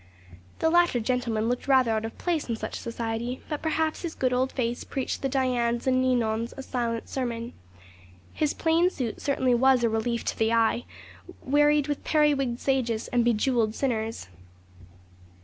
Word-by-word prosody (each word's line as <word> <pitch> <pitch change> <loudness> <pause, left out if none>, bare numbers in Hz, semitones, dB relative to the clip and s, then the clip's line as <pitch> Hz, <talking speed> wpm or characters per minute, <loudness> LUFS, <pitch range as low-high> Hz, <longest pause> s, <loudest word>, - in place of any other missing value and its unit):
The 320 - +1
latter 345 -7 +4
gentleman 230 -2 -1
looked 245 +2 -2
rather 260 -4 +4
out 220 0 0
of 225 - -7
place 335 -7 -2
in 230 - 0
such - - -5
society; 235 +1 -4
but, 300 -2 -3
perhaps, 315 0 -1
his 340 -2 -5
good 255 -1 0
old 255 +1 +1
face 240 -2 -2
preached 265 -2 -3
the 270 - 0
Dianes 245 -3 0
and 255 -1 +3
Ninons 230 -3 0
a 270 - -6
silent 235 -3 -3
sermon. 240 -2 -4 0.8
His 300 -2 0
plain 330 +2 +3
suit 250 -10 -4
certainly 260 -3 +1
was 255 0 +4
a 230 - +3
relief 225 +1 -1
to - - -2
the 225 +1 +2
eye, 230 +1 +2 0.6
wearied 295 +1 +3
with 290 -1 -3
periwigged 285 -6 +2
sages 240 -5 -1
and 245 -1 +2
bejewelled 230 -1 +1
sinners. 225 - -2
250 Hz, 165 wpm, -26 LUFS, 230-275 Hz, 0.8 s, latter